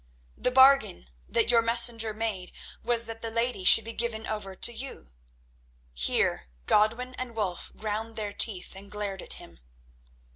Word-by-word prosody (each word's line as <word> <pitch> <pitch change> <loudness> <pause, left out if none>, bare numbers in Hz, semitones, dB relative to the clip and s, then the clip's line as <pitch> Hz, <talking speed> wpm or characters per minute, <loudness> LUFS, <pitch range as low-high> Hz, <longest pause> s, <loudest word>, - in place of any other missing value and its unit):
The - - -1
bargain 260 - +3 0.2
that 230 - +2
your 235 -1 +4
messenger 230 -1 +4
made 215 -4 -5 0.3
was 235 -1 +3
that 225 0 -9
the 230 - -4
lady 230 -3 -2
should 220 +4 +7
be 230 - -7
given 225 -1 -3
over 200 -3 -6
to 240 - +4
you—" 250 - -7 0.8
Here - - 0 0.2
Godwin 230 +4 0
and 250 -2 -7
Wulf 190 -5 -4
ground 220 +1 -5
their 210 -2 -5
teeth 195 -4 0
and 200 +1 -9
glared 205 -2 -5
at - - +4
him. - - -10
225 Hz, 155 wpm, -26 LUFS, 205-235 Hz, 0.8 s, should